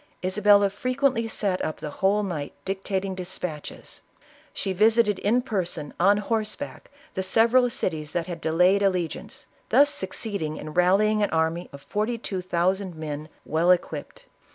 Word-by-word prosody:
Isabella 205 +1 +4
frequently 255 +2 0
sat 200 -4 -1
up 155 - -3
the 150 - -6
whole 200 +2 +3
night 160 -7 -4
dictating 195 0 -2
despatches; 180 -4 -6 0.5
she 190 - -3
visited 215 0 +3
in 240 +5 +2
person, 180 - -3
on 200 +4 +5
horseback, 215 +5 -3 0.2
the 190 - -2
several 230 +6 +4
cities 160 - -3
that 170 -2 -1
had 175 -2 -6
delayed 180 +5 +3
alle 195 -1 +3
giance, - - -9 0.2
thus 290 +1 +5
succeeding 190 - -3
in 155 - -7
rallying 200 +5 +3
an 205 - +2
army 160 +2 0
of 140 0 -12
forty 215 +3 -1
two 195 -4 -4
thousand 185 +1 0
men, 155 -1 -6 0.2
well 160 +3 +1
equipped. - - 0
190 Hz, 150 wpm, -25 LUFS, 175-215 Hz, 0.5 s, on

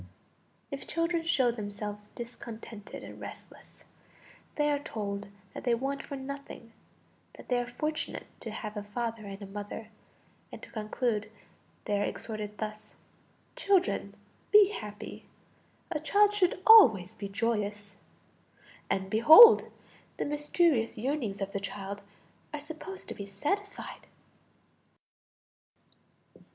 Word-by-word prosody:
If 280 - -6
children 335 0 0
show 260 -7 +3
themselves 210 -1 -6
discontented 230 -3 -9
and - - -10
restless, - - -12 0.7
they 295 0 +2
are 290 - +1
told 205 -7 -5 0.3
that - - -7
they 240 -2 +3
want 275 +3 -2
for 280 - -7
nothing, 270 -4 -8 0.6
that - - -14
they 250 -1 +2
are 245 - -3
fortunate 305 +6 -3
to - - -6
have 210 -1 -6
a 210 - -3
father 225 +1 -4
and 195 0 -7
a - - -5
mother, 205 +2 -7 0.6
and - - -8
to - - -11
conclude, 215 -1 -2 0.6
they 205 -1 0
are - - +2
exhorted 210 -1 -5
thus: 215 0 -6 0.6
"Children, 390 -2 +1 0.4
be 415 -2 +8
happy 210 - -8 0.7
a 310 - -1
child 405 +7 +4
should 370 -2 +1
always 220 - +8
be 200 -1 -6
joyous"; 205 -2 -2 0.9
and 190 0 0
behold! 310 - +9 0.5
the - - -1
mysterious 295 -4 +1
yearnings 235 -5 -2
of 195 0 -2
the 200 - -2
child 200 0 -6 0.5
are 300 - -4
supposed 320 +6 -9
to - - -4
be 200 - -8
satisfied! 395 - -4
230 Hz, 125 wpm, -30 LUFS, 205-295 Hz, 0.9 s, behold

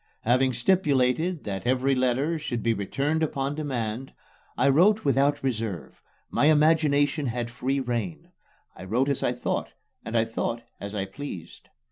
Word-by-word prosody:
Having 130 +2 +2
stipulated 150 +2 +1
that 100 +2 -4
every 130 +2 +2
letter 130 +5 +1
should 120 -7 -3
be 115 - +2
returned 140 +10 -1
upon 140 -2 -1
demand, 130 -5 -3 0.4
I - - +3
wrote 185 +10 +4
without 140 +1 +2
reserve 110 - -3 0.3
my - - +2
imagination 150 -1 +3
had 120 0 -3
free 130 +3 -1
rein. 120 -9 -3 0.4
I 95 - -9
wrote 125 +8 +1
as 140 - 0
I 120 - +1
thought, 125 - -3 0.3
and 115 +1 -2
I 115 - +3
thought 115 +1 -3 0.2
as 100 +1 -6
I 95 -1 -1
pleased. 95 - -9
130 Hz, 150 wpm, -26 LUFS, 115-145 Hz, 0.4 s, wrote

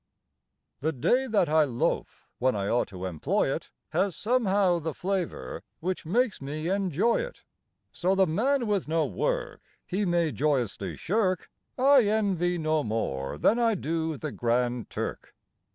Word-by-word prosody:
The 160 +3 0
day 215 - +2
that 210 -7 +2
I 155 +1 +4
loaf 125 -5 -2
when 130 -1 +2
I 100 -1 -1
ought 120 +3 +1
to 95 -2 -7
employ 85 -5 0
it - - -5 0.2
Has, 195 -4 0
somehow, 200 -6 +2
the 160 -2 -4
flavor 190 -2 -3 0.2
which 180 -1 -3
makes 230 - +1
me 155 +4 -3
enjoy 195 +2 +2
it. - - -5 0.5
So 185 +2 +1
the 190 0 +5
man 240 - +1
with 205 -6 0
no 160 0 +1
work - - -2 0.2
He 200 +3 -1
may 170 -3 +2
joyously 120 - -1
shirk 185 - 0 0.3
I 265 -1 +6
envy 195 -5 +1
no 155 -2 +1
more 75 - -2
than 225 - +3
I 230 -2 +3
do 160 -2 -2
the - - -4
Grand 120 0 0
Turk. - - -5
175 Hz, 150 wpm, -28 LUFS, 140-205 Hz, 0.5 s, I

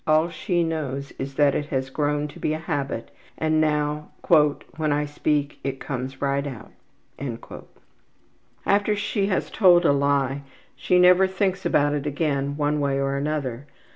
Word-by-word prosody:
All 155 +1 +4
that 170 - -7
she 175 -2 0
knows 140 -4 -3
is 135 0 -5
that 145 -1 +4
it 145 - -2
has 130 -2 -2
grown 150 +1 0
to - - -12
be 155 - 0
a - - -1
habit 140 -6 -3 0.3
and 155 0 +2
now 150 -1 0 0.2
``when 150 -1 +2
I 145 +1 +1
speak 145 0 -1
it 135 -1 -3
comes 130 0 -5
right 140 +1 0
out.'' 125 0 -9 1.0
After 205 +1 +2
she 205 -1 -1
has 190 - -1
told 175 -4 +5
a 145 - +5
lie 140 -1 +1 0.3
she 180 - +1
never 180 +1 +6
thinks 190 0 -1
about 145 0 +2
it 150 0 -2
again 140 -1 -1
one 150 0 +1
way 140 -1 0
or 135 0 0
another. 140 -2 -3
145 Hz, 165 wpm, -24 LUFS, 140-160 Hz, 1.0 s, never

